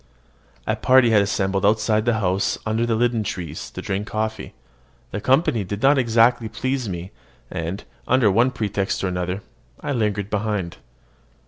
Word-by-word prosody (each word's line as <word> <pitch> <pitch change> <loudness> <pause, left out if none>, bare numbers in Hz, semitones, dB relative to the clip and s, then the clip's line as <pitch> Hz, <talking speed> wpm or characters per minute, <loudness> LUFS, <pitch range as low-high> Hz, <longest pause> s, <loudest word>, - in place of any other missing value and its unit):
A - - 0
party 130 -2 +4
had 105 -2 +5
assembled 95 -1 0
outside 110 +1 +2
the 120 -2 +2
house 95 +1 +1
under 110 +2 0
the 115 - +1
linden 120 0 +1
trees, 85 -6 -5
to - - -8
drink 100 +2 -2
coffee. 110 0 -3 0.6
The 100 - -4
company 130 -4 +2
did 100 +4 -5
not 140 +1 +5
exactly 115 -1 +3
please 130 +1 -2
me; 90 +1 -6 0.4
and, 85 +5 -4 0.2
under 125 -5 +4
one 120 +6 +4
pretext 100 -7 -2
or - - +1
another, 90 +2 -3 0.4
I - - -4
lingered 105 -5 -1
behind. 105 -4 -2
105 Hz, 155 wpm, -22 LUFS, 100-120 Hz, 0.6 s, had